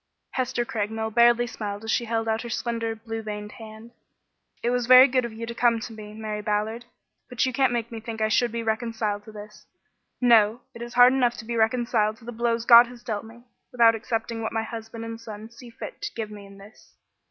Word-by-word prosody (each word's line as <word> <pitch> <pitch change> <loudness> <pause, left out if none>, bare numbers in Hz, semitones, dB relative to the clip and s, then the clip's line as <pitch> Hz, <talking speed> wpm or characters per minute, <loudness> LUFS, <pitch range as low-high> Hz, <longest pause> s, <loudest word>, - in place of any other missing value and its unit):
Hester 255 -2 -1
Craigmile 220 -2 -3
barely 240 +1 +5
smiled 210 -3 -6
as 220 - -2
she 240 - +1
held 225 0 -2
out 220 0 0
her 235 - -7
slender, 230 -1 -2
blue 225 0 -6
veined 210 -1 -6
hand. 220 +1 -11 0.7
"It 240 - +1
is 245 -1 0
very 255 +1 +9
good 255 -2 +1
of 235 - -6
you 230 +1 -6
to 235 - -6
come 235 -1 +2
to 230 0 -7
me, 210 -1 -10
Mary 215 -1 -4
Ballard, 215 +3 -2 0.4
but 250 0 0
you 260 - -2
can't 265 -1 +2
make 235 -1 -2
me 225 - -6
think 225 0 -7
I 215 - +2
should 235 +2 +2
be 230 0 -3
reconciled 220 -2 -2
to 220 - -11
this. 210 0 -12 0.5
No! 230 -1 +4
It 235 - -11
is 240 +1 -7
hard 245 +1 +7
enough 245 -2 +1
to 220 - -8
be 235 +1 -4
reconciled 225 -1 +1
to 225 - -17
the 240 - -6
blows 230 0 -1
God 235 0 +9
has 240 -1 -13
dealt 215 -2 -4
me, 235 +2 -14 0.3
without 230 -2 +5
accepting 225 0 -3
what 220 - -3
my 225 0 -1
husband 225 0 -7
and 230 0 -7
son 220 0 -9
see 240 +1 -13
fit 230 - -9
to - - -5
give 220 -2 -4
me 205 -1 -10
in 195 0 -15
this." 200 +3 -17
225 Hz, 230 wpm, -25 LUFS, 220-240 Hz, 0.7 s, very